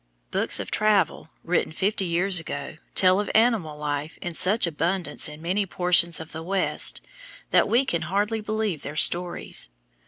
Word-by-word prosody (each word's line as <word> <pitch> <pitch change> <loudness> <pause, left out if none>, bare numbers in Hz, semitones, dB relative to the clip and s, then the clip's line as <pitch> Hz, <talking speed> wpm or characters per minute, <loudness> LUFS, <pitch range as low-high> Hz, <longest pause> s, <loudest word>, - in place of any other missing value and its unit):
Books - - +1
of - - -6
travel 210 -6 +1
written 170 -1 0
fifty 195 +4 -1
years 180 +2 +2
ago 145 -1 -7 0.2
tell 185 0 +5
of 205 - -3
animal 220 -10 +2
life 150 +1 -4
in 175 - -5
such 195 +7 +3
abundance 170 -1 -1
in 150 +1 -11
many 195 +4 -1
portions 175 -2 +3
of 160 0 -9
the 160 - -7
West 190 +3 0 0.5
that - - +3
we 250 +4 +3
can 170 -9 -1
hardly 205 +6 -1
believe 215 -6 -2
their 145 - -7
stories. 175 - +2
180 Hz, 160 wpm, -24 LUFS, 160-200 Hz, 0.5 s, tell